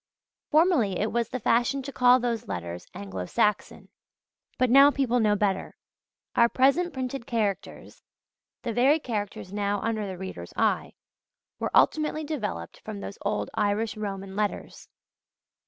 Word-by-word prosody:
Formerly 305 - +3
it 215 +1 -1
was 235 -1 0
the 255 - -4
fashion 245 +4 +1
to 280 - -6
call 250 -1 +5
those 235 -2 -2
letters 85 -2 -5
Anglo 95 -2 -6
Saxon: 210 -1 0 0.7
but 255 -2 +2
now 275 +2 +8
people 260 -4 +1
know 210 -2 +3
better. 195 -2 -1 0.6
Our 235 0 +5
present 275 +9 +3
printed 260 -2 -5
characters 215 -5 -3 0.6
the 235 - -2
very 265 +7 +4
characters 205 -7 -5
now 205 0 0
under 220 -2 -2
the 190 -1 -6
reader's 190 +1 -7
eye - - +1 0.7
were - - -1
ultimately 310 0 +3
developed 220 - -4
from 215 -2 -7
those 200 - -8
old 205 +1 -2
Irish 215 +1 0
Roman 195 -2 -5
letters. 210 0 -3
225 Hz, 140 wpm, -27 LUFS, 200-255 Hz, 0.7 s, now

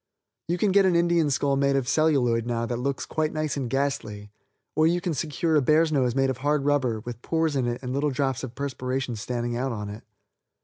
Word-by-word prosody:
You 175 +2 0
can 200 +2 +2
get 195 0 +5
an 180 - +2
Indian 170 -2 +3
skull 140 0 +1
made 140 0 +2
of 135 -3 0
celluloid 130 -6 +2
now 115 -1 -1
that 120 0 -3
looks 135 +2 -2
quite 155 -1 -1
nice 155 -1 -2
and 135 -4 -3
ghastly, 110 -7 -2 0.4
or 155 +1 +4
you 175 +2 +2
can 175 -1 -2
secure 160 +2 -1
a 150 - +5
bear's 155 +4 +3
nose 130 -5 +1
made 135 -1 +2
of 130 - -5
hard 145 0 0
rubber, 130 -6 +1
with 120 0 -8
pores 160 -1 0
in 130 -3 +1
it 120 +2 -3
and 125 0 -3
little 145 +2 +1
drops 135 -2 -1
of 125 -2 -6
perspiration 130 -2 -3
standing 120 +2 -3
out 130 +2 -1
on 105 -3 -5
it. 105 +2 -9
135 Hz, 225 wpm, -26 LUFS, 120-155 Hz, 0.4 s, get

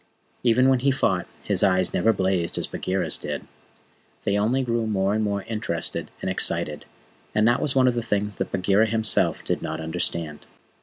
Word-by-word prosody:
Even 125 +2 +4
when 130 -1 +4
he 135 +3 +2
fought, 95 -9 +1 0.2
his - - -1
eyes 95 -2 +3
never 115 - +3
blazed 95 -4 0
as - - -1
Bagheera's 95 +1 -2
did. 75 -1 -5 0.8
They 100 - +1
only 115 +6 +1
grew 115 -2 -1
more 100 -2 +1
and 110 +1 +1
more 100 -1 -1
interested 105 -7 -3
and - - -2
excited; - - -1 0.5
and 105 +1 +4
that 120 +1 +3
was 140 - -1
one 130 -1 +5
of 125 - +3
the 120 - -1
things 105 -2 -1
that - - -3
Bagheera 100 +3 +3
himself 110 0 +2
did - - -1
not - - -4
understand. 80 -2 -3
105 Hz, 185 wpm, -24 LUFS, 95-115 Hz, 0.8 s, one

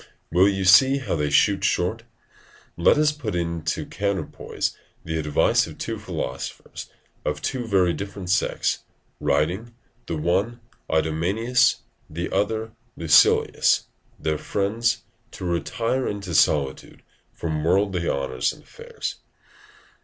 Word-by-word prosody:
Will 90 +4 +5
you 95 -1 -1
see 130 +9 +7
how 130 - -2
they 75 -2 0
shoot - - +3
short? - - 0 0.7
Let 85 - +4
us 150 0 +4
put 150 -10 -5
into 85 -2 -2
the - - -14
counterpoise 100 -5 -2 0.3
the 80 0 -2
advice 75 -2 +2
of - - -10
two - - -4
philosophers, 65 - -6 0.3
of 75 0 -2
two 125 +3 -3
very 95 -5 +3
different 100 -2 -5
sects, 95 - +1 0.4
writing, 100 +10 0 0.3
the 85 - -2
one 95 +9 0 0.3
to - - 0
Idomeneus, 100 +11 +2 0.3
the 85 +3 -4
other 110 +2 0
to - - -26 0.3
Lucilius, 80 -1 +4 0.3
their 75 -1 -2
friends, 110 +4 0 0.3
to 95 - -7
retire 115 +9 -1
into 100 -4 -4
solitude 70 -3 +1 0.3
from 80 -2 -3
worldly 95 0 +1
honours 65 -2 -1
and - - -14
affairs. - - -7
90 Hz, 130 wpm, -24 LUFS, 80-110 Hz, 0.7 s, see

